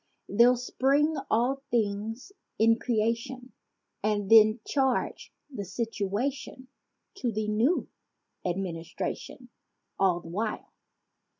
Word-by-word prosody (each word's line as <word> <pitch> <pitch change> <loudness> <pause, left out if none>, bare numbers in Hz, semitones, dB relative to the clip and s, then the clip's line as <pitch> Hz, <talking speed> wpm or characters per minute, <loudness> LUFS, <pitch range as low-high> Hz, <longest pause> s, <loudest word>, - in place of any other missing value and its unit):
They'll 240 +4 +5
spring 280 +5 +1
all 250 +5 +1
things 225 - -2 0.3
in 225 +1 +4
creation 235 +2 -1 0.5
And 205 -1 -1
then 215 0 +7
charge 265 -3 0 0.2
the 205 -5 -4
situation 230 +6 -3 0.5
To 250 -9 -1
the 215 0 -2
new 225 +11 +1 0.6
administration— 180 +7 -4 0.5
All 185 -3 +3
the 165 - -11
while. 210 +5 -3
225 Hz, 95 wpm, -28 LUFS, 205-255 Hz, 0.6 s, then